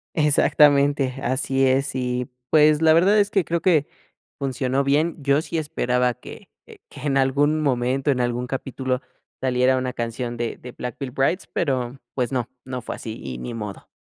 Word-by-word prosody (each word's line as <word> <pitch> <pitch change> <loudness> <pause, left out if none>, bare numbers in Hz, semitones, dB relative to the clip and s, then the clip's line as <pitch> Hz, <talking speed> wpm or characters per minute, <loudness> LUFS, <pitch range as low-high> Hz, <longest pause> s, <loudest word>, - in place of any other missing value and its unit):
Exactamente, 145 -2 +4
así 135 +1 +1
es. 135 +1 +1
Y, 125 -1 -2 0.2
pues, 155 0 +5
la 160 0 +6
verdad 195 +6 +5
es 200 - +2
que 195 -5 +1
creo 170 -1 -1
que 160 -6 +3 0.5
funcionó 135 0 -1
bien. 150 +4 +1
Yo 140 +1 +2
sí 165 - -4
esperaba 125 -5 0
que - - -12 0.4
que 145 - -12
en 140 - +1
algún 145 +3 +2
momento, 135 +1 +1
en 125 - -1
algún 120 0 -1
capítulo, 130 0 -3 0.4
saliera 130 0 +2
una 130 0 -2
canción 120 +1 -4
de 120 -1 -3
de 125 - -10
Black 125 -2 -6
Veil 135 -3 -4
Brides 135 +8 0
pero, 130 -4 -1 0.2
pues 125 0 -1
no 125 -2 -1 0.2
no 125 -1 -5
fue - - -6
así 110 -1 -7
y 65 -2 -5
ni 120 - -6
modo. 105 -3 -7
135 Hz, 175 wpm, -23 LUFS, 125-145 Hz, 0.5 s, la